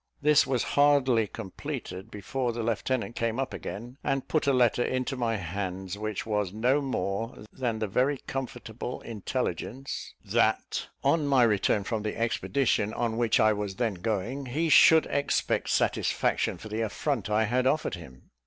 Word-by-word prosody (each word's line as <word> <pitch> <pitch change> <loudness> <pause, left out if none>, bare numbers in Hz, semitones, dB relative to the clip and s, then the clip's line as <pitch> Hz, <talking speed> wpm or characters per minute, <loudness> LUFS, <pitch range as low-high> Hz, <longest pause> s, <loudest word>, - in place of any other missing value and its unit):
This 150 0 +4
was 130 -3 +1
hardly 135 -6 +4
completed, 100 -2 -6
before 120 +4 -3
the 115 0 -3
lieutenant 115 +1 -1
came 115 +1 -1
up 135 -1 -2
again, 120 +6 -7
and 135 -1 -1
put 155 -3 0
a - - +5
letter 125 -2 +3
into 130 +2 -1
my 115 -3 0
hands: 95 0 -4
which 105 -1 -4
was 105 -4 -1
no 125 +7 +2
more 115 -5 -3
than 120 -4 -2
the 110 - -1
very 130 +8 +1
comfortable 125 -2 -5
intelligence, 120 +4 -4
that, - - +1 0.2
on 145 +2 +2
my 135 -3 +5
return 105 -2 +2
from 110 +1 -2
the 105 0 -3
expedition 115 -2 0
on 115 -2 -1
which 115 -2 +2
I 110 0 +5
was 105 -2 -4
then 115 -2 0
going, 110 +8 -3
he 160 +7 0
should 160 +2 +7
expect 140 - 0
satisfaction - - +1
for 110 - -10
the 110 +1 -3
affront 115 +1 -2
I 105 +1 +3
had 125 +4 +1
offered 150 -2 +1
him. 70 -8 -11
115 Hz, 160 wpm, -28 LUFS, 105-135 Hz, 0.2 s, should